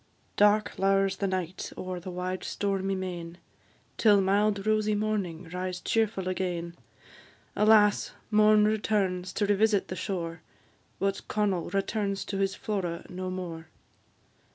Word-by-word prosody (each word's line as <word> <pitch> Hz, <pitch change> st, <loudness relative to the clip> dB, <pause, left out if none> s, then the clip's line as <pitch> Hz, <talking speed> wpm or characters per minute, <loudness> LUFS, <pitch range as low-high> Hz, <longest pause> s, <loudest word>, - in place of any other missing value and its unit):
Dark 210 Hz, +1 st, +3 dB
lowers 195 Hz, 0 st, +2 dB
the 200 Hz, -, -1 dB
night 185 Hz, -1 st, -3 dB
o'er 185 Hz, -1 st, -4 dB
the 180 Hz, +2 st, -8 dB
wide 180 Hz, +1 st, -4 dB
stormy 195 Hz, -1 st, -1 dB
main, 175 Hz, -2 st, -5 dB, 0.6 s
Till 210 Hz, -3 st, +5 dB
mild 200 Hz, +1 st, +2 dB
rosy 215 Hz, -1 st, +2 dB
morning 200 Hz, -6 st, -2 dB
rise 180 Hz, 0 st, -3 dB
cheerful 215 Hz, -4 st, 0 dB
again; 175 Hz, -2 st, -2 dB, 0.8 s
Alas! 210 Hz, -1 st, +4 dB, 0.2 s
morn 215 Hz, 0 st, +5 dB
returns 200 Hz, -4 st, 0 dB
to 205 Hz, -, +1 dB
revisit 205 Hz, 0 st, +2 dB
the 185 Hz, -, -4 dB
shore, 165 Hz, -4 st, -4 dB, 0.6 s
But 195 Hz, 0 st, -2 dB
Connel 200 Hz, -5 st, 0 dB
returns 195 Hz, +1 st, -1 dB
to 195 Hz, -, -3 dB
his 195 Hz, 0 st, 0 dB
Flora 180 Hz, -5 st, -3 dB
no 185 Hz, +1 st, -4 dB
more. 170 Hz, -3 st, -6 dB
195 Hz, 130 wpm, -28 LUFS, 180-210 Hz, 0.8 s, Till